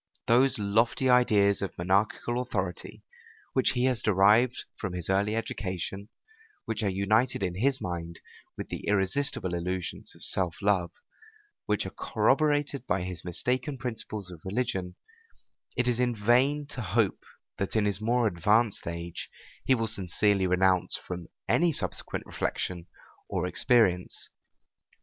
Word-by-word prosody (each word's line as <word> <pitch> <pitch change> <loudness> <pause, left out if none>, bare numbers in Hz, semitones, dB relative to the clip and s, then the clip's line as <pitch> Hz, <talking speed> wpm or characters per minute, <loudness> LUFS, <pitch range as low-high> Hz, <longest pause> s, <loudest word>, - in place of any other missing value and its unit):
Those 125 +4 +4
lofty 115 +5 +2
ideas 105 -5 +4
of 100 - -4
monarchical 100 +7 +1
authority, 95 -8 -4 0.5
which 130 - +3
he 125 -1 0
has 130 -2 +1
derived 105 +5 +4
from 95 -4 -5
his 90 +1 -3
early 100 +3 +1
education, 95 -2 -4 0.6
which 115 0 -2
are 105 - +1
united 100 +4 +1
in 90 -2 -1
his 130 +8 +1
mind 85 -1 -5 0.4
with - - -6
the - - -6
irresistible 95 -1 +1
illusions 90 +1 -4
of - - -4
self 90 -4 +1
love, 100 -4 +1 0.8
which - - +1
are - - -5
corroborated 145 -3 +1
by 90 0 0
his 90 -2 -6
mistaken 125 - -1
principles 110 -6 -5
of 85 -3 -11
religion, 95 -3 -2 0.8
it 125 - +1
is 120 -1 +1
in 125 -1 +1
vain 125 +7 +2
to 125 - -4
hope 110 -2 +1 0.4
that, 100 - -2
in 110 -2 +3
his 100 0 0
more 120 +2 +2
advanced 105 +3 +2
age, 85 0 -5 0.4
he 130 - +4
will 115 -2 -1
sincerely 100 -1 +1
renounce 90 0 +2
from 90 -2 -7 0.2
any 170 0 +3
subsequent - - -2
reflection 90 -1 -3 0.4
or - - -1
experience. 95 -8 +2
105 Hz, 140 wpm, -28 LUFS, 90-120 Hz, 0.8 s, Those